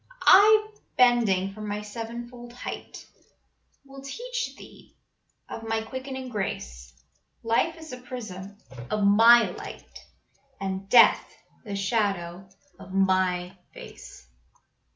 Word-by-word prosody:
I, 430 +2 +6 0.3
bending 215 -6 +3
from 215 +1 -8
my 210 +1 -4
sevenfold 235 +2 -8
height, 245 - -8 0.8
Will 270 0 -12
teach 480 - -5
thee - - -16 0.5
of - - -7
My 225 0 -2
quickening 260 +2 -7
grace, 65 - -5 0.5
Life 235 +9 +1
is 315 -4 -10
a 250 - -7
prism 205 -6 -8 0.3
of 215 -1 -1
My 230 +4 +6
light, - - -10 0.6
And 195 0 -5
Death 245 - +5 0.3
the 205 -2 -5
shadow 195 -3 -2 0.3
of 195 -1 -12
My 185 -1 +1 0.2
face." - - -12
220 Hz, 110 wpm, -26 LUFS, 195-250 Hz, 0.8 s, I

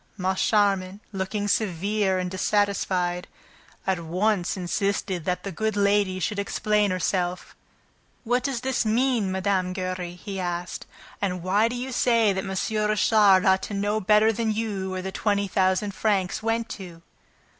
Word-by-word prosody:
Moncharmin, 190 0 +1
looking 205 +1 -2
severe 200 0 0
and 180 -1 -2
dissatisfied, 185 -2 0 0.6
at 190 -2 0
once 180 +3 0
insisted 190 -1 -1
that 180 -1 -1
the 195 - -4
good 220 +3 -2
lady 200 -2 +2
should 205 +2 -2
explain 210 +1 +1
herself. 180 0 -2 0.7
"What 245 +1 +1
does 265 -3 -2
this 265 -1 0
mean, 230 -2 +1
Mme. 190 -1 0
Giry?" 185 -2 -4
he 195 +1 -6
asked. 175 0 -4 0.3
"And 180 -3 -2
why 200 +5 +3
do 240 - -4
you 255 +2 -4
say 230 -4 +3
that 190 0 -2
M. - - -5
Richard 210 0 +3
ought 190 0 +4
to 205 - -5
know 205 +2 0
better 215 +3 +4
than 225 0 0
you 210 -3 -2
where 185 0 -4
the 190 - -4
twenty 205 0 0
thousand 190 +2 +1
francs 195 -2 0
went 225 +1 -1
to?" 175 -4 -9
200 Hz, 150 wpm, -25 LUFS, 185-215 Hz, 0.7 s, ought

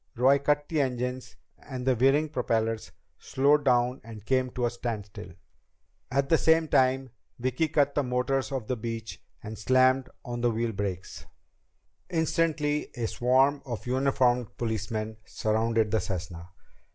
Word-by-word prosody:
Roy 130 +3 +4
cut 145 +1 +1
the 155 -3 +1
engines, 125 -1 -3 0.2
and 130 -2 -7
the 130 -1 +3
whirring 135 +6 +3
propellers 115 -4 -1 0.3
slowed 145 +2 +2
down 125 0 +2
and 110 -2 -11
came 130 0 +1
to 125 - -1
a 120 - 0
standstill. 115 -4 -6 0.8
At 135 +1 +1
the 160 - +3
same 160 0 +3
time, 130 0 +2 0.3
Vicki 130 +6 0
cut 145 -2 +2
the 145 - +1
motors 130 +1 -1
of 130 -5 -3
the 125 - -1
Beech 115 -1 -6 0.2
and 110 0 -7
slammed 130 +3 +3 0.2
on 120 -1 -4
the 120 - +3
wheel 115 0 -1
brakes. 95 -3 -5 0.8
Instantly 160 -3 0
a 120 - -2
swarm 130 +5 +2
of 120 -4 -6
uniformed 125 -2 +1
policemen 110 -1 -3
surrounded 110 0 0
the 110 - +2
Cessna. 90 -4 -5
125 Hz, 145 wpm, -28 LUFS, 115-135 Hz, 0.8 s, Roy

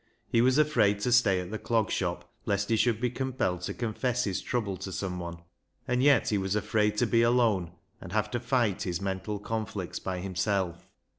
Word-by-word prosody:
He 115 - +3
was 130 +2 +4
afraid 140 -10 +3
to 125 - 0
stay 105 -6 +4
at 90 +1 -8
the 110 - -3
Clog 115 -3 0
Shop 85 -2 -2 0.2
lest 100 -1 0
he 115 - +3
should 110 -1 +2
be 125 0 0
compelled 125 -9 -1
to 90 - -3
confess 125 +2 -1
his 95 -5 -1
trouble 110 -6 -2
to 95 - -6
someone, 90 -3 -5 0.4
and 125 0 +1
yet 140 +1 +4
he 105 - +1
was 95 +1 -1
afraid 105 0 +1
to 120 - +3
be 115 0 +3
alone 115 -8 +2 0.3
and 90 - -9
have 105 +1 0
to 120 - -1
fight 120 -5 +1
his 90 -2 -2
mental 100 +2 -3
conflicts 105 -3 -4
by 95 -1 -3
himself. 95 -1 -2
105 Hz, 200 wpm, -29 LUFS, 95-120 Hz, 0.4 s, was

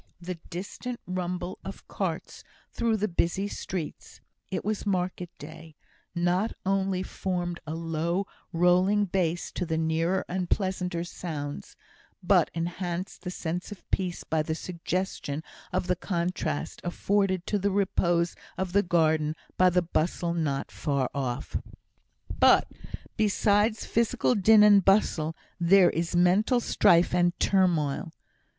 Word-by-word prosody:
The 180 -1 -6
distant 205 +7 -6
rumble 180 0 -3
of - - -9
carts - - -4 0.3
through 230 -2 +1
the 210 +1 0
busy 180 +2 0
streets 180 -5 -6 0.3
(it - - -3
was 215 -1 -1
market 180 -3 -1
day) 160 +1 -11 0.4
not 180 +5 +1
only 190 -1 +1
formed 175 -2 -3
a 155 - -3
low 165 +3 -1 0.3
rolling 180 +4 +3
bass 175 -3 -1
to - - -3
the 160 -2 -1
nearer 165 +4 0
and 180 0 -3
pleasanter 180 -3 -1
sounds, 150 -5 -6 0.5
but - - +4
enhanced 175 +2 -3
the 180 - -5
sense 180 +2 -4
of 205 - -10
peace 180 -3 -1
by 160 -1 0
the 155 +1 -2
suggestion 170 -3 -3 0.3
of 180 0 0
the 180 0 +1
contrast 170 - -2
afforded 190 0 0
to 205 - 0
the 200 +1 +1
repose 175 -3 +1 0.2
of 185 -1 -3
the 200 - +5
garden 160 -4 +2 0.2
by 185 0 +5
the 180 0 +2
bustle 170 +1 -1
not 150 -5 -2
far 140 -4 -1
off. 130 -4 -3 0.8
But - - +6 0.5
besides 210 +1 +2
physical 230 +2 +1
din 215 0 +6
and 205 -2 +7
bustle, 165 -5 +2 0.2
there 180 +2 +6
is 170 +1 -2
mental 190 +8 +4
strife 170 -7 +4
and 175 -1 +2
turmoil. 170 -4 +1
180 Hz, 130 wpm, -27 LUFS, 165-190 Hz, 0.8 s, and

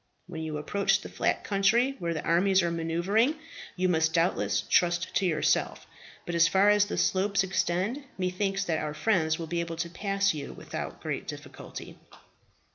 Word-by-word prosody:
When 170 -3 -7
you 155 -1 -4
approach 200 +7 +1
the - - -8
flat - - -1
country 230 +7 +2
where 170 -1 -2
the 155 - -4
armies 190 +2 +3
are 170 - 0
maneuvering 175 - +1 0.4
you 185 0 +1
must 160 -2 +1
doubtless 105 - +1
trust 175 0 +2
to 190 - +2
yourself; 155 -3 0 0.4
but 175 - -4
as 170 0 +5
far 195 +4 +4
as 210 0 +4
the 205 - -4
slopes 195 +1 +2
extend, 190 +7 -1
methinks 195 +1 -1
that 160 -4 -1
our 150 -1 -4
friends 160 -5 +1
will 165 - -5
be 170 +1 -2
able 170 -1 -3
to 170 +1 -4
pass 195 +1 0
you 145 -2 -6
without - - -7
great - - -4
difficulty." - - -9
175 Hz, 175 wpm, -28 LUFS, 165-195 Hz, 0.4 s, as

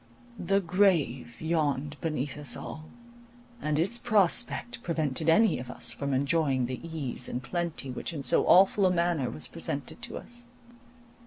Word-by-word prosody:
The 195 +3 +2
grave 165 - +1
yawned 150 -3 -1
beneath 150 -4 -2
us 145 -3 -2
all, 155 - -8 0.8
and 150 -1 0
its 195 +9 +1
prospect 235 +2 +2
prevented 160 - -1
any 210 +3 +4
of 125 0 -8
us - - -1
from 140 0 -3
enjoying 135 -1 +1
the 125 0 -5
ease 150 -7 0
and 125 - -4
plenty 160 0 -3
which 125 - -4
in 150 -4 -5
so 125 - +2
awful 190 +1 +6
a - - +2
manner 170 -7 0
was 75 0 -4
presented 145 - -5
to 235 -1 -6
us. 240 0 -6
160 Hz, 155 wpm, -28 LUFS, 135-180 Hz, 0.8 s, awful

